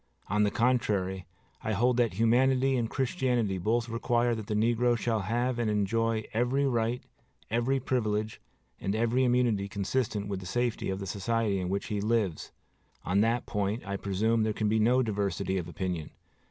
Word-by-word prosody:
On 105 +2 +2
the 105 - +4
contrary, 100 -6 0 0.4
I 110 - -1
hold 120 +4 +2
that 120 -5 +2
humanity 130 +4 +3
and 115 -3 0
Christianity 125 - 0
both 115 +6 0
require 120 +1 +1
that 110 -3 -5
the 105 - -1
negro 120 +2 +2
shall 115 0 0
have 120 +5 -1
and 115 -2 +1
enjoy 110 +2 +1
every 125 +5 +1
right, 120 -1 0 0.5
every 120 +4 +1
privilege, 110 -4 -1 0.4
and 100 +2 -2
every 115 +3 +2
immunity 120 -5 +2
consistent 105 +1 -2
with 100 -2 -3
the 90 - -8
safety 120 +3 -1
of 95 - -1
the 100 - -5
society 105 +1 0
in 90 -1 -3
which 100 +1 -2
he 105 -1 -1
lives. 105 -6 0 0.5
On 95 +3 +2
that 115 +2 +1
point, 105 +2 -2
I 100 0 -3
presume, 105 +4 0
there 110 0 +1
can 105 0 -1
be 110 +1 +2
no 125 +4 +4
diversity 100 -3 -1
of 85 - -5
opinion. 85 -2 -4
110 Hz, 175 wpm, -29 LUFS, 100-120 Hz, 0.5 s, the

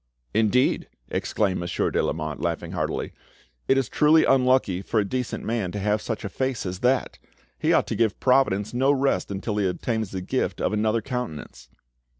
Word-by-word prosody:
"Indeed," 115 +4 +2 0.2
exclaimed 100 -4 0
Monsieur 85 0 -1
de - - +1
Lamotte, 75 -2 -3
laughing - - -2
heartily, - - -3 0.5
"it 135 - +4
is 135 -4 +1
truly 155 +1 +4
unlucky 130 -8 +3
for 110 +2 0
a 105 - +1
decent 125 +3 -3
man 110 -5 -1
to - - -3
have 105 +1 +1
such 110 -2 -4
a - - -3
face 130 0 -2
as 90 0 -4
that! 125 +3 +1 0.4
He - - +2
ought - - +4
to - - -3
give 110 -3 +1
Providence 125 -6 +2
no 135 +3 +3
rest 135 -9 +1
until 100 +2 -3
he 100 -2 +2
obtains 110 +3 -2
the 95 -1 -5
gift 130 +8 -2
of - - 0
another 110 +1 +1
countenance." 80 - -6
110 Hz, 180 wpm, -25 LUFS, 95-130 Hz, 0.5 s, it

